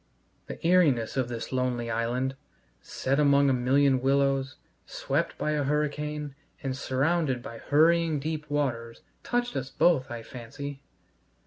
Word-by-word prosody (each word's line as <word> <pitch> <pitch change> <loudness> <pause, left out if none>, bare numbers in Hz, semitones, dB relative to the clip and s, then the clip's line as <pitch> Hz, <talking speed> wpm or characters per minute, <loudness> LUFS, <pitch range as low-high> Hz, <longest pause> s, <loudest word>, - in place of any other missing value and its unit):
The - - -6
eeriness 150 -11 +3
of 130 -2 0
this 115 -2 -5
lonely 125 -2 -1
island, 125 +4 -1 0.5
set 135 +2 -2
among 140 -1 +4
a - - +3
million 130 +1 +3
willows, 135 0 +1 0.3
swept - - -2
by 150 - -1
a 150 -1 0
hurricane, 150 0 -2 0.3
and 135 -2 -2
surrounded 135 0 0
by 115 -4 -8
hurrying 160 +1 +3
deep 155 0 -4
waters, 120 -6 -2 0.2
touched 245 0 -1
us 130 0 -3
both, 135 -1 +2
I 120 -1 -6
fancy. 135 +4 -8
135 Hz, 135 wpm, -27 LUFS, 125-150 Hz, 0.5 s, among